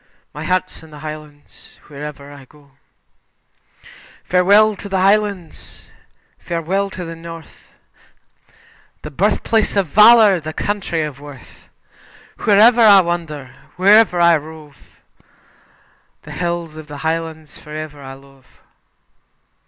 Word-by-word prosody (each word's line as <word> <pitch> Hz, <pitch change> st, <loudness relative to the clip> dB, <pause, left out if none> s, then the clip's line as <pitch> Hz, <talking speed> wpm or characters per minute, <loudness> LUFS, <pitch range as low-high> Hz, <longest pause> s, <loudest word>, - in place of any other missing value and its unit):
My -, -, -7 dB
Heart's 185 Hz, 0 st, -2 dB
In 160 Hz, -, -16 dB
The 150 Hz, -, -13 dB
Highlands 150 Hz, -1 st, -12 dB
Tune 145 Hz, -2 st, -12 dB
"Failte 150 Hz, -1 st, -7 dB
na 145 Hz, +1 st, -13 dB
Miosg." 140 Hz, +1 st, -19 dB, 1.5 s
Farewell 200 Hz, +4 st, +3 dB
to 200 Hz, -, -9 dB
the 190 Hz, -1 st, -1 dB
Highlands, 200 Hz, -3 st, -1 dB, 0.5 s
farewell 180 Hz, +4 st, -3 dB
to 185 Hz, -2 st, -8 dB
the 165 Hz, 0 st, -8 dB
North, 165 Hz, 0 st, -12 dB, 1.4 s
The 150 Hz, -, -8 dB
birth 200 Hz, +9 st, 0 dB
place 220 Hz, -2 st, 0 dB
of 200 Hz, -2 st, +1 dB
Valour, 210 Hz, +2 st, +6 dB
the 155 Hz, 0 st, -7 dB
country 190 Hz, -5 st, -3 dB
of 145 Hz, -3 st, -7 dB
Worth; 145 Hz, -2 st, -15 dB, 0.8 s
Wherever 225 Hz, +3 st, +5 dB
I 205 Hz, -3 st, +7 dB
wander, 155 Hz, -7 st, -5 dB, 0.2 s
wherever 200 Hz, 0 st, +4 dB
I 170 Hz, -1 st, +5 dB
rove, 155 Hz, -1 st, -12 dB, 1.5 s
The -, -, -12 dB
hills 170 Hz, -3 st, -4 dB
of 155 Hz, -1 st, -10 dB
the 145 Hz, -1 st, -9 dB
Highlands 160 Hz, -1 st, -4 dB
for 150 Hz, -, -17 dB
ever 155 Hz, -2 st, -8 dB
I 135 Hz, -1 st, -9 dB
love. 135 Hz, -1 st, -21 dB
165 Hz, 125 wpm, -18 LUFS, 150-195 Hz, 1.5 s, I